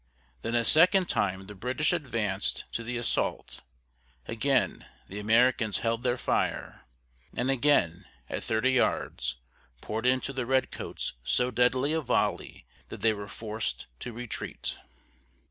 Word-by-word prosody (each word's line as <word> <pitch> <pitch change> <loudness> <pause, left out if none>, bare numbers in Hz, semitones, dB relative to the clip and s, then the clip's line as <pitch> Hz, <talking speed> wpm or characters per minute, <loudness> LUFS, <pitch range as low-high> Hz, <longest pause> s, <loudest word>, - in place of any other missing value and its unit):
Then 115 - -2
a 115 -1 +2
second 180 - +6
time 95 -1 0
the 105 - -9
British 125 - 0
advanced 115 - -1
to 115 - -3
the 120 +1 -3
assault; 120 - -1 0.7
again 130 +3 0 0.2
the 100 - -6
Americans 110 -1 +3
held 115 0 +1
their 125 0 +1
fire, - - -1 0.5
and 125 +2 +1
again, 120 - +2 0.2
at - - -4
thirty 110 +4 +2
yards, 65 - 0 0.4
poured 110 - -2
into 130 +2 +1
the 130 -3 -3
Redcoats 130 0 -1
so 125 - +2
deadly 130 +4 +2
a 160 - +1
volley 135 - -1 0.2
that - - -8
they 115 -1 +4
were 100 -1 -7
forced 110 +1 -4
to 120 - -5
retreat. 120 0 -4
120 Hz, 135 wpm, -29 LUFS, 105-130 Hz, 0.7 s, second